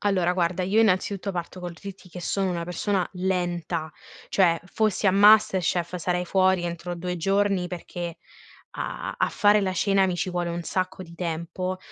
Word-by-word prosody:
Allora 185 -4 +2
guarda, 180 0 0
io 205 +5 +3
innanzitutto 200 -1 +1
parto 180 +1 -5
col 175 -1 -5
dirti 190 +2 -10
che 180 - -8
sono 195 +1 -1
una 170 -1 -2
persona 180 +2 -1
lenta. 175 -3 -2 0.4
Cioè 170 -4 +3
fossi 210 +1 0
a - - +6
MasterChef 190 -3 +4
sarei 180 +1 -1
fuori 185 -1 +3
entro 170 +1 -4
2 180 +1 -4
giorni 195 +1 +1
perché 175 -1 -6 0.6
a - - -4
a - - +1
fare 210 0 +4
la 190 -1 0
cena 195 +1 +3
mi 180 -1 -1
ci 185 - -1
vuole 175 -1 -2
un 170 0 -3
sacco 185 +2 -2
di 170 - -13
tempo, 175 +2 -3
180 Hz, 170 wpm, -25 LUFS, 175-195 Hz, 0.6 s, a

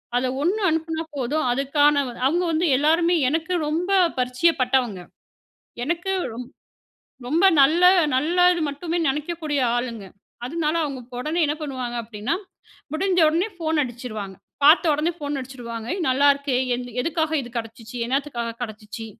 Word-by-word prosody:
அதுல 255 +1 +1
1 375 +8 0
அனுப்புனா 320 0 -2
போதும். 275 +3 -1
அதுக்கான 290 +3 +3 0.3
அவுங்க 340 +7 +2
வந்து 325 +2 +1
எல்லோருமே 330 +5 +3
எனக்கு 320 +4 -1
ரொம்ப 335 +5 -1 0.3
பரிச்சயப்பட்டவங்க. 250 - +1 0.8
எனக்கு 345 +7 -2 1.2
ரொம்ப 320 +9 +2 0.2
நல்ல 310 +6 +4 0.3
நல்லது 350 +6 +3
மட்டுமே 325 +4 -3
நினைக்கக்கூடிய 300 +1 -2 0.2
ஆளுங்க. 235 -4 -4 0.4
அதனால 310 +2 -1
அவுங்க 255 -4 -7
உடனே 310 +6 -1
என்ன 295 - -1
பண்ணுவாங்க 255 -5 -4
அப்படின்னா, 220 +5 -3 0.6
முடிஞ்ச 370 +3 +1
உடனே 335 +6 0
ஃபோன் 320 -2 -1
அடிச்சுருவாங்க. 225 -6 -7 0.3
பாத்த 310 +5 +7
உடனே 305 +4 0
ஃபோன் 290 -2 -3
அடிச்சிடுவாங்க, 240 -3 -7 0.2
"நல்லாயிருக்கே 280 +1 +3 0.2
எந் 250 0 -5 0.2
எதுக்காக 320 +1 -1
இது 240 - -9
கிடைச்சுச்சு? 225 0 -7
என்னத்துக்காக 250 -3 -2
கிடச்சிச்சு?" 215 0 -7
285 Hz, 120 wpm, -23 LUFS, 250-325 Hz, 1.2 s, பாத்த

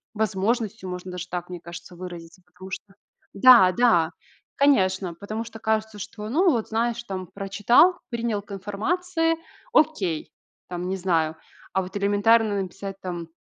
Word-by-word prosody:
возможностью 215 -1 -1
можно 180 0 -6
даже 180 0 -6
так, 175 0 -4
мне 180 -1 -6
кажется, 175 +1 -10
выразиться. 175 -1 -9
Потому 185 +2 -13
что 195 0 -7 0.4
Да, 200 -4 +8
да, 180 -7 +3 0.4
конечно, 190 -10 +2
потому 215 +5 -5
что 225 -1 -10
кажется, 220 -1 -1
что, 210 +2 -7
ну 345 - +3
вот 235 -7 0
знаешь 235 +1 0
там 185 -4 -5
прочитал, 210 - +3
принял 235 -3 -2
к 205 - -17
информации, 325 - -1 0.4
окей, 210 - +1 0.4
там 180 0 -4
не 190 - -1
знаю. 165 -4 +1 0.4
А, 190 - +2
вот 185 +2 -10
элементарно 205 +1 +3
написать 195 +1 -7
там: 175 -2 -5
200 Hz, 150 wpm, -25 LUFS, 180-230 Hz, 0.4 s, Да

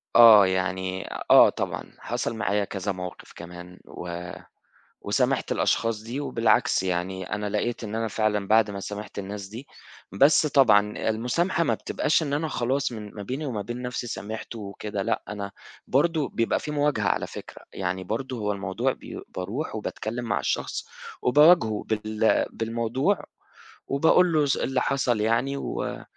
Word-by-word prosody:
آه، 110 -4 +9
يعني 95 0 -2 0.2
آه - - +9
طبعًا، - - -3 0.2
حصل 115 - -3
معايا 105 -2 0
كذا 100 +1 -3
موقِف 90 -1 -7
كمان 90 +1 -10
و 90 0 -7 0.7
وسامحت - - 0
الأشخاص 115 -2 +1
دي 120 +5 -4
وبالعكس 115 -8 +2
يعني 95 +1 -3
أنا 105 0 -3
لقيت 115 +4 -2
إن 110 0 -4
أنا 115 0 -1
فعلًا 105 -2 0
بعد 110 0 +4
ما 100 - -5
سامحت 105 +1 -6
الناس 100 0 -6
دي 115 +7 -9 0.4
بس 140 - +5
طبعًا 105 -8 +4
المسامحة 145 +11 0
ما - - +1
بتبقاش 160 +2 0
إن 140 -2 -3
أنا 155 +2 0
خلاص 135 0 -1
من 105 -3 -8
ما 105 - -7
بيني 130 +9 -4
وما 115 -7 -3
بين 120 +4 -6
نَفْسي 125 -1 -4
سامحت 110 +1 -6
وكده 105 -1 -5
لأ، - - -1
أنا 100 -1 -5 0.4
برضه 150 +1 +2
بيبقى 115 -1 0
في 150 - -5
مواجهة 145 -8 +1
على - - 0
فكرة، - - -10
يعني 95 0 -3
برضه 120 +6 -3
هو 105 -1 -1
الموضوع 95 -2 -1
بي - - -9
باروح 110 +11 -4
وباتكلّم 110 +2 -4
مع 100 -3 0
الشخص - - -2 0.4
وباواجهه 140 -5 +5
بال 110 0 +1
بالموضوع 115 - -1 0.6
وباقول 160 +5 +4
له 150 -2 +3
س 135 - +1
اللي 130 -1 0
حصل 125 -6 +1
يعني 120 +5 +1
و - - -4
110 Hz, 155 wpm, -26 LUFS, 100-130 Hz, 0.7 s, آه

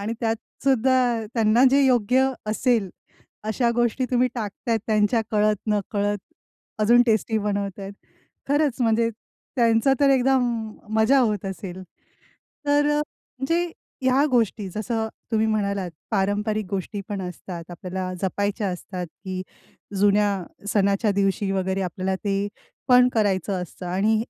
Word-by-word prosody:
आणि 210 +3 -2
त्यात 225 -1 +1 0.3
सुद्धा 260 -1 +3 0.4
त्यांना 230 +2 +4
जे 275 +1 +4
योग्य 255 +1 +3 0.2
असेल, 215 -2 +1 0.5
अशा 235 +3 +1
गोष्टी 240 +2 +1
तुम्ही 250 0 +3
टाकतायेत 225 0 -2
त्यांच्या 215 +1 +2
कळत 210 0 +3
नकळत 205 0 0 0.6
अजून 240 +3 +6
टेस्टी 220 0 +2
बनवतायत. 200 -1 -3 0.6
खरंच 285 -2 +1
म्हणजे 230 -1 +3 0.5
त्यांचा 230 +2 +4
तर 280 -1 +5
एकदम 245 -4 +2 0.3
मजा 235 +6 +5
होत 210 -6 0
असेल. 190 -1 -6 0.8
तर 290 0 +3
अ, - - +2 0.4
म्हणजे 335 +6 0 0.3
ह्या 260 +2 +4
गोष्टी 225 -4 +1
जसं 220 +1 -2 0.2
तुम्ही 220 0 +3
म्हणालात, 200 -4 -1 0.2
पारंपरिक 210 +1 0
गोष्टी 200 +1 -3
पण 205 -2 -3
असतात, 180 -1 -7
आपल्याला 185 +1 -5
जपायच्या 200 +2 -1
असतात, 180 0 -5
की 185 +2 -7 0.6
जुन्या 205 -2 +3 0.3
सणाच्या 200 +1 +2
दिवशी 195 0 +1
वगैरे 190 0 -1
आपल्याला 185 +1 -2
ते 200 0 0 0.4
पण 250 0 +7
करायचं 195 -3 +1
असतं 180 +1 -9
आणि 195 +5 +2
215 Hz, 125 wpm, -24 LUFS, 195-240 Hz, 0.8 s, पण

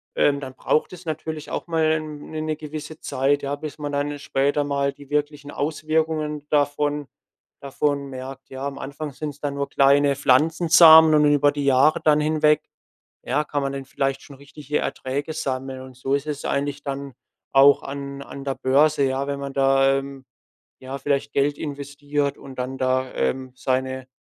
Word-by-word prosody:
ähm, 140 -1 +3
dann 135 -2 -7
braucht 155 +6 0
es 180 0 -11
natürlich 155 -1 -5
auch - - -3
mal, 165 -1 +1
ähm, 155 -1 -2
'ne 155 -1 -4
'ne 155 0 -2
gewisse 155 0 -8
Zeit, 140 +1 0
ja, 140 +1 -2
bis 150 0 -7
man 145 -1 -4
dann 145 +1 -2
später 140 +1 0
mal 140 -1 -1
die 140 -1 -15
wirklichen 145 -1 -2
Auswirkungen 155 0 -1
davon 145 0 0 0.5
davon 140 0 -1
merkt, 135 +1 -8
ja. 135 +1 -5
Am 140 -1 -6
Anfang 145 +2 -6
sind's 145 0 -6
dann 145 -1 -2
nur 140 0 -3
kleine 140 0 +4
Pflanzensamen 160 +3 +6
und 150 0 +5
über 145 0 +4
die 145 -1 -3
Jahre 140 +5 +4
dann 150 -1 +4
hinweg, 150 0 +3 0.6
ja, 150 - 0
kann 145 -1 -2
man 135 - -1
denn 135 -1 -5
vielleicht 135 0 -2
schon 140 - -13
richtige 145 +1 -4
Erträge 140 +4 -3
sammeln. 130 -2 -4
Und 130 -1 -12
so 135 +1 -2
ist 140 +2 -3
es 150 -1 -4
eigentlich 145 0 -2
dann 140 -1 -5 0.4
auch 140 +1 +6
an 140 0 -6
an 140 0 -9
der 135 -1 -2
Börse, 140 +2 +3
ja, 135 +1 0
wenn 140 0 -3
man 140 0 -5
da, 135 0 +3
ähm, 135 -1 -9 0.5
ja, 130 +1 -6
vielleicht 140 0 -1
Geld 145 +1 +1
investiert 145 -1 -3
und 135 -2 -12
dann 130 +1 -3
da, 130 0 0
ähm, 130 -1 -2
seine 130 0 -2
140 Hz, 180 wpm, -23 LUFS, 135-150 Hz, 0.6 s, Pflanzensamen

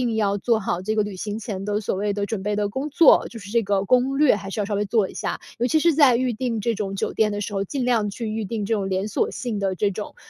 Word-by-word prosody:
要 200 -2 +1
做 225 +2 +1
好 180 -3 -2
这 215 +3 -2
个 215 - +2
旅 205 - -5
行 205 +3 -4
前 195 -4 -5
的 210 +1 -1
所 195 - -2
谓 205 +1 -1
的 200 0 -2
准 205 -1 -4
备 205 +1 -1
的 205 -1 0
工 270 +8 -4
作， 305 +2 +5
就 230 - -10
是 200 -2 -10
这 235 0 +3
个 200 -1 +1
攻 255 +5 +2
略 295 -6 +5
还 195 -1 -7
是 210 - -4
要 - - -1
稍 205 - -2
微 205 +1 0
做 205 -1 +1
一 - - -11
下。 - - -3 0.2
尤 240 +2 +1
其 315 - +2
是 335 0 +3
在 275 -5 +6
预 255 0 +1
订 230 -2 -2
这 235 +2 0
种 195 -2 -4
酒 - - -2
店 215 -1 +2
的 205 - -3
时 205 - -4
候， 195 - 0
尽 265 +5 -3
量 230 -4 +1
去 225 +2 -5
预 215 -1 -3
订 210 0 -3
这 225 - 0
种 195 -2 -1
连 190 +2 -1
锁 - - 0
性 230 -5 -4
的 195 -1 -1
这 200 +2 +1
种， 205 +2 -7
210 Hz, 330 characters per minute, -23 LUFS, 200-235 Hz, 0.2 s, 在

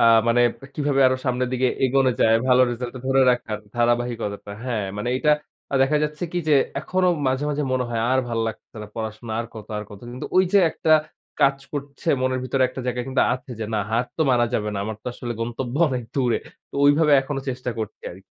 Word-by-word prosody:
আ - - +4 0.3
মানে 120 +1 +4 0.3
কিভাবে 145 -2 +1
আরো 130 0 +2
সামনের 125 -1 0
দিকে 130 0 +2 0.2
এগোনো 130 0 +3
যায় 115 0 +5
ভালো 125 0 +6
রেজাল্টটা 120 +1 -5
ধরে 135 0 +3
রাখার 110 -3 -1 0.2
ধারাবাহিকতাটা। 120 -4 -1
হ্যাঁ, 110 -6 -2
মানে 105 +4 -3
এইটা 150 +3 +2 0.4
আ - - 0
দেখা 140 +3 +2
যাচ্ছে 150 +3 -3
কি 175 - 0
যে 150 - +5 0.3
এখনো 185 0 +1 0.2
মাঝে, 130 +2 +1
মাঝে 150 0 -1
মনে 130 -1 +1
হয় 115 -1 -1
আর 130 - +3
ভাল 115 -1 -2
লাগছে 110 - -10
না 105 - -7
পড়াশোনা 110 0 -5
আর 115 - -5
কত? 110 - -9
আর - - -4
কত? 100 - -11
কিন্তু 125 - -6
ওই 185 - +6
যে 200 - +7
একটা 160 - -2 0.5
কাজ 135 0 +4
করছে 145 +3 -5
মনের 130 0 0
ভিতরে 130 +1 +1
একটা 130 - -7
জায়গায় 125 0 -1
কিন্তু 130 - +2
আছে 130 +1 -10
যে - - -1
না - - +1
হার 115 +2 +1
তো 160 - +2
মারা 120 -1 +3
যাবে 105 0 0
না। 100 - -3
আমার 110 0 -4
তো - - -18
আসলে 120 -1 -5
গন্তব্য 120 +2 -3
অনেক 130 -3 -2
দূরে। 125 -4 +1 0.3
তো - - -17
ওইভাবে 150 +1 +5
এখনো 135 +1 -4
চেষ্টা 125 -1 -3
করছি 110 -2 -5
আর 90 - -12
125 Hz, 215 wpm, -23 LUFS, 115-135 Hz, 0.5 s, যে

